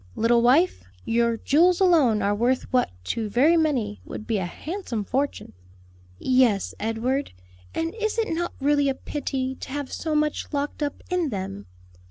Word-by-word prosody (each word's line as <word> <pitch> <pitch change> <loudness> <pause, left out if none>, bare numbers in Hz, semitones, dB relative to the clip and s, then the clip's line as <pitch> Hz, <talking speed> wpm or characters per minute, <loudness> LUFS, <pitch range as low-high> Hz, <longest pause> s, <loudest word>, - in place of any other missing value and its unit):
"Little 235 +1 +3
wife, 285 +10 +3 0.2
your 235 0 +1
jewels 340 +9 +3
alone 295 - +4
are 200 +1 +2
worth 240 +5 +1
what 250 - +3
to 215 - -2
very 275 +10 +4
many 265 -11 0
would 215 - -8
be 220 -3 0
a 185 - -2
handsome 305 - -5
fortune." 270 - -2 0.6
"Yes, 250 - +2
Edward, 235 +6 -1 0.4
and 330 +1 -1
is 435 -1 -2
it 445 -7 0
not 345 +1 -2
really 285 0 +2
a 270 - -1
pity 265 -2 -3
to - - -9
have 285 0 -4
so 315 -2 -2
much 300 0 0
locked 290 +1 -3
up 290 -1 -3
in 355 -4 +1
them?" 185 - -5
265 Hz, 165 wpm, -25 LUFS, 230-310 Hz, 0.6 s, alone